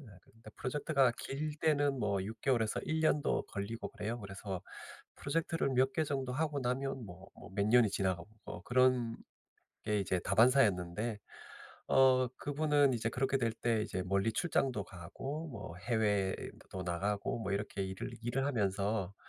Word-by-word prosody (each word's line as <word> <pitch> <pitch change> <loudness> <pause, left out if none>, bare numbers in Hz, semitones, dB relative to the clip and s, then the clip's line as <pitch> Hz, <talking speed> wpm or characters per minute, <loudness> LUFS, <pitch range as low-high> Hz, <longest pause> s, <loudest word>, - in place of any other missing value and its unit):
예 140 - -13 0.2
그러니까 115 0 -16
프로젝트가 135 -2 +2
길 150 +3 -3
때는 145 -3 +2
뭐 100 -4 0
6 110 +1 -7
개월에서 115 -5 +1
1 160 0 0
년도 150 -2 +2
걸리고 100 +3 -4
그래요. 115 +2 -4
그래서 95 -2 -6 0.5
프로젝트를 165 0 0
몇 130 +1 +3
개 160 - +2
정도 135 -3 -2
하고 150 0 -1
나면 130 0 -2
뭐 95 +1 -11
뭐 - - -12
몇 100 0 +1
년이 115 -2 +5
지나가고 95 -3 -1 0.2
어 - - -7
그런 125 -2 +3 0.7
게 105 -1 +1
이제 95 -2 0
다반사였는데 105 -2 +3 0.7
어 130 -1 +5
그분은 145 -2 +2
이제 115 -1 0
그렇게 135 +3 0
될 115 -3 +1
때 115 -1 0
이제 95 -4 -3
멀리 100 +4 +1
출장도 130 - 0
가고 135 - -6
뭐 100 -8 -7
해외도 100 -4 -1
나가고 100 +6 -1
뭐 100 -3 -3
이렇게 100 -1 -2
일을 95 0 -5
일을 135 +3 0
하면서 100 -5 0
115 Hz, 315 characters per minute, -34 LUFS, 100-135 Hz, 0.7 s, 년이